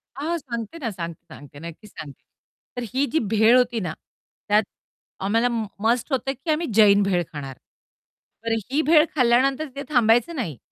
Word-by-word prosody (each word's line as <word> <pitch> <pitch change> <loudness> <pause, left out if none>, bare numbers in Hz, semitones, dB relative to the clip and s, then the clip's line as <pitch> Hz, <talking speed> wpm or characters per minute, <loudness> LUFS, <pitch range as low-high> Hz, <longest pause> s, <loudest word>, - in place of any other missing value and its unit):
हां, 320 +5 -2
सांगते 235 +1 -6
ना 250 -8 -3
सांगते, 170 -3 -7
सांगते, 145 0 -13
नक्कीच 170 +6 -10
सांगते. 140 -3 -11 0.5
तर 245 - -2
ही 275 +2 +2
जी 320 - +2 0.2
भेळ 225 +4 +6
होती 240 -2 +1
ना, 175 -5 -4 0.5
त्यात 210 +1 +4 0.6
आम्हाला 230 +4 +2 0.3
मस्ट 235 +5 +1
होत, 265 +1 -1
की 270 +4 -3
आम्ही 320 +2 0
जैन 205 -2 +6
भेळ 180 -3 +1
खाणार. 135 -3 -7 0.9
तर 230 - -1 0.2
ही 300 +3 +2
भेळ 310 +1 +5
खाल्ल्यानंतर 265 +4 +2
ते 280 - -5
थांबायचं 240 +4 +3
नाही. 175 - -4
235 Hz, 160 wpm, -23 LUFS, 200-275 Hz, 0.9 s, भेळ